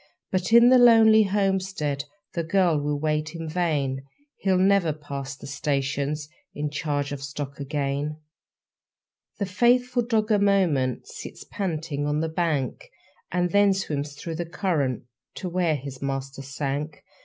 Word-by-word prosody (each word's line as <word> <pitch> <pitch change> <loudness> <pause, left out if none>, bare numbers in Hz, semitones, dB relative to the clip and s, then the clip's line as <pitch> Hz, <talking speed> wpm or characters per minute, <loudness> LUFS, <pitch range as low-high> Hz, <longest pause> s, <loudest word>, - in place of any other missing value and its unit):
But 185 +1 -1
in 235 +1 +8
the 255 0 +7
lonely 220 -2 +7
homestead 190 -7 0 0.3
The 170 - -1
girl 170 -3 +2
will 145 0 -1
wait 155 +1 -1
in 165 -1 -5
vain 150 -6 0 0.4
He'll 190 -2 +2
never 190 -4 +3
pass 140 -2 -6
the - - -11
stations 140 +1 -2 0.3
In 150 0 -2
charge 145 -1 -2
of 145 -1 -5
stock 140 +1 -6
again. 145 +1 -2 1.2
The 200 - -1
faithful 245 +5 +2
dog 225 -2 0
a 210 - +4
moment 175 - +2
Sits - - -9
panting 160 -6 -3
on 150 +1 0
the 160 +1 -1
bank, 155 -5 -1 0.4
And 180 -1 0
then 200 0 +4
swims 145 -6 -3
through 160 +2 -6
the 175 - -2
current 155 - -1 0.3
To 185 - -5
where 175 -3 +1
his 135 -1 -7
master 135 0 -4
sank. 140 +2 -4
155 Hz, 145 wpm, -25 LUFS, 140-190 Hz, 1.2 s, in